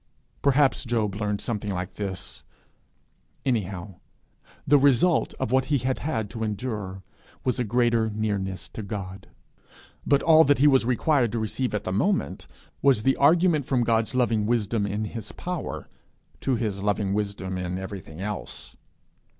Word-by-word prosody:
Perhaps 140 -1 +3
Job 110 -4 0
learned 105 0 -2
something 105 -3 -3
like 90 0 -4
this; 95 -3 -6 1.0
anyhow, 100 -6 -2 0.7
the 145 +1 +5
result 140 +5 +3
of - - -3
what 130 0 +3
he 145 - +2
had 130 0 -1
had 110 -8 -2
to 110 - -4
endure 105 -3 -4 0.4
was 125 0 0
a - - +2
greater 115 -1 +2
nearness 100 -4 -2
to - - -7
God. 100 -2 -6 0.8
But 140 -1 +2
all 160 -1 +7
that 145 +1 +4
he 140 - +3
was 135 -4 +5
required 125 -1 +2
to 115 - 0
receive 110 +2 -2
at 105 - -2
the 95 - -3
moment 190 - 0 0.3
was 135 -6 +4
the 135 +2 +3
argument 160 -1 +4
from 125 -3 +2
God's 115 0 +1
loving 115 -4 +2
wisdom 110 -2 0
in 105 +2 -2
his 110 0 -7
power, 180 -2 -5 0.5
to 130 - 0
his 105 -4 -2
loving 100 -1 0
wisdom 100 -3 -2
in 90 0 -3
everything 95 -4 -7
else. 105 +2 -6
110 Hz, 155 wpm, -26 LUFS, 100-130 Hz, 1.0 s, all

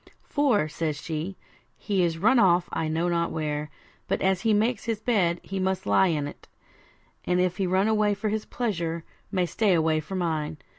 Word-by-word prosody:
'For,' 260 - +2
says 155 -1 -3
she, 165 +5 -4 0.4
'he 200 -3 0
is 165 -1 0
run 225 +9 +4
off 180 -3 +4
I 160 - -1
know 160 +2 0
not 170 -1 +1
where, 150 -1 -3 0.4
but - - 0
as 190 -1 +2
he 225 - +2
makes 220 +2 +1
his 225 -2 -1
bed, 190 -7 +1
must 190 0 0
he - - -5
lie 190 - +5
on't; 145 -1 -5 0.8
and 180 0 +1
if 180 0 +1
he 195 -2 0
run 190 +3 +2
away 210 -2 +2
for 210 +2 -2
his 215 0 -2
pleasure, 170 -8 -2 0.3
may 185 -3 +1
stay 195 +3 +2
away 160 -1 +2
for 155 +5 -6
mine. 160 -3 -2
180 Hz, 190 wpm, -26 LUFS, 160-205 Hz, 0.8 s, lie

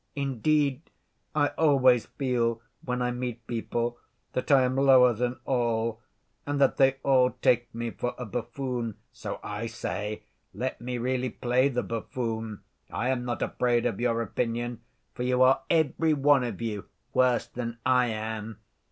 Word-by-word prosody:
Indeed, 140 +1 0 0.5
I 145 -1 +3
always 130 -6 +4
feel 120 -4 0 0.2
when 125 0 -1
I 125 - 0
meet 120 -1 -4
people 120 +1 -2 0.3
that 125 - -2
I 135 -2 +6
am 125 0 0
lower 130 -2 +6
than 125 +2 -2
all, 115 -3 0 0.4
and 145 0 -2
that 135 - +3
they 135 -1 +5
all 130 -2 +4
take 120 -1 +3
me 115 0 -3
for 125 - -3
a 125 - -5
buffoon. 120 0 -3 0.2
So - - -6
I 105 +2 -4
say, 105 -2 -4 0.3
'Let 130 0 -3
me 125 +1 -3
really 130 +1 -1
play 125 +3 +1
the 125 -2 -1
buffoon. 115 -2 -4 0.3
I 125 +3 -1
am 125 -2 -1
not 120 -1 -2
afraid 120 -1 +1
of 100 - -1
your 115 -1 +1
opinion, 120 +2 -2 0.3
for - - -7
you 125 +1 +3
are 130 +1 +5
every 160 0 +2
one 140 -1 +4
of 115 -6 -4
you 105 -3 -3 0.3
worse 125 -2 +3
than 115 -1 -5
I 125 -1 +4
am. 110 -1 -4
125 Hz, 160 wpm, -28 LUFS, 115-130 Hz, 0.5 s, I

